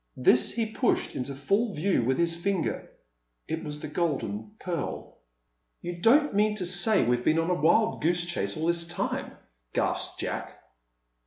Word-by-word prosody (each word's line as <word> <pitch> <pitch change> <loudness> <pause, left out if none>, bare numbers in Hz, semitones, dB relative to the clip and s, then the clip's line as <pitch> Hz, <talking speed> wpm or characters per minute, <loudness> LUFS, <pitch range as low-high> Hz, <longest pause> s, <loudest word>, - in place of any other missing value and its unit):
This 125 0 +4
he 230 -1 0
pushed 220 +3 0
into 135 +2 -4
full 200 - 0
view 165 -4 +1
with 130 +3 +1
his 170 -1 +1
finger. 185 +1 -2 0.6
It 160 0 -3
was 150 -1 -6
the - - -6
Golden 145 - -2
Pearl. 175 -2 -5 0.6
"You 175 0 -5
don't 285 - +4
mean 210 +1 +2
to 190 -4 -2
say 185 - +4
we've 120 +1 +1
been 155 - +2
on 165 +2 +1
a 180 - -1
wild 220 +8 +3
goose 175 +2 +2
chase 175 -1 -2
all 155 - -2
this 170 0 +1
time?" 175 - -3 0.4
gasped - - -2
Jack. - - -4
170 Hz, 165 wpm, -27 LUFS, 150-200 Hz, 0.6 s, This